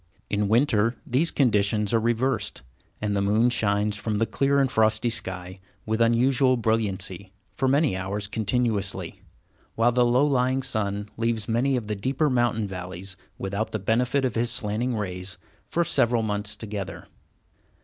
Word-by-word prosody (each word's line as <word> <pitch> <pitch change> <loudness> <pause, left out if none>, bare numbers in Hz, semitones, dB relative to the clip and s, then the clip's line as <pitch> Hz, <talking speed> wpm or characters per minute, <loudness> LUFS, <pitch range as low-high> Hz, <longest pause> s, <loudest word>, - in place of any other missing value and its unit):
In 105 0 +1
winter, 115 0 +3
these 140 +7 +1
conditions 105 -4 +1
are 115 - +4
reversed, 120 -1 -1 0.4
and 105 -1 0
the 100 - +1
moon 110 +5 +3
shines 105 -2 +1
from 105 0 -2
the 115 - +2
clear 140 +4 +1
and 135 -2 +2
frosty 110 +1 +2
sky 95 -3 -4 0.3
with 110 +1 -1
unusual 125 +3 +3
brilliancy, 100 -5 -1 0.2
for 130 - 0
many 140 - +3
hours 100 +2 -3
continuously, 105 -1 -1 0.5
while 115 +2 +3
the 125 0 +3
low 125 +4 +4
lying 130 -1 +1
sun 105 -5 -2
leaves 115 -2 0
many 125 +4 +1
of 120 -4 -2
the 105 0 -3
deeper 130 +8 0
mountain 120 -3 +1
valleys 90 0 -6 0.2
without 100 +3 -3
the - - +1
benefit 125 +6 +1
of 125 - -1
his 115 +1 0
slanting 120 +1 -1
rays 90 -3 -5 0.3
for 170 - +1
several 120 -7 +2
months 105 -1 -2
together. 105 -3 -6
110 Hz, 155 wpm, -25 LUFS, 100-125 Hz, 0.5 s, are